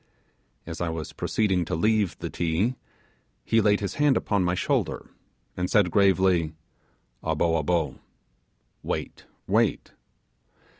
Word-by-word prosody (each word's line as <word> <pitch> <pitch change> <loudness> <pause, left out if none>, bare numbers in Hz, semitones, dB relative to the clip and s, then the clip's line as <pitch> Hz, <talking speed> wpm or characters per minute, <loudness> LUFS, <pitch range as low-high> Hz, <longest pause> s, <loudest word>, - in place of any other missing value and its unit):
As 80 0 -7
I 85 - 0
was 80 -2 -5
proceeding 95 -5 0
to - - -2
leave 105 +2 +1
the - - -5
Ti, 85 +8 0 0.7
he 115 - +3
laid 105 -1 +3
his 100 - -3
hand 145 -2 +4
upon 100 -3 0
my 90 0 +1
shoulder, 90 - -1 0.4
and 90 0 -2
said 100 -6 +3
gravely, 95 -5 +3 0.7
'abo, 80 +1 +1
abo' 85 0 -1 0.8
(wait, - - -5 0.2
wait). - - +1
90 Hz, 120 wpm, -26 LUFS, 80-105 Hz, 0.8 s, hand